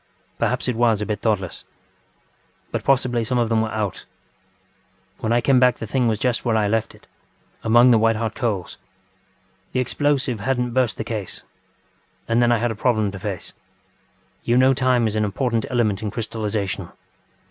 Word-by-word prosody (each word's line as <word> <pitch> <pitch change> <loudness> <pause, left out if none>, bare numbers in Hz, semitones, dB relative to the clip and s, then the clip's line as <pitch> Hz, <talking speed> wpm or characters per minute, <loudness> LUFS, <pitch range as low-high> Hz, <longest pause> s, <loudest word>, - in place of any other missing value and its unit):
Perhaps - - 0
it 125 - 0
was 115 -2 +2
a 105 - -2
bit 105 -1 -3
thoughtless. 95 -6 -1 1.1
But - - -3
possibly 125 -3 +2
some 125 +3 -1
of 120 -2 +1
them 115 -1 +2
were 110 - -1
out. 105 -4 -3 1.1
ŌĆ£When 110 - -1
I 120 +1 +3
came 130 0 +4
back 125 -1 +4
the - - -5
thing 125 +2 0
was 110 -2 +1
just 125 +2 -1
where 115 -2 +1
I 105 -1 +2
left 110 +1 -1
it, - - -21 0.6
among 120 +3 +6
the 115 - +5
white 115 0 +3
hot 110 0 -2
coals. 105 -7 -3 0.9
The 130 - +1
explosive 135 -2 0
hadnŌĆÖt 125 +2 -1
burst 125 -3 +1
the - - -3
case. 110 -4 -5 0.8
And 115 +1 +2
then 120 0 +4
I 120 - +4
had 120 +1 0
a - - -4
problem 110 -3 +1
to 95 - -8
face. 100 -2 -5 0.9
You 120 +1 +2
know 130 +1 +5
time 130 -2 +2
is 110 -1 -1
an 110 - +1
important 115 +2 -1
element 110 -5 0
in 110 - -2
crystallisation. 105 -3 -3
115 Hz, 180 wpm, -22 LUFS, 110-125 Hz, 1.1 s, among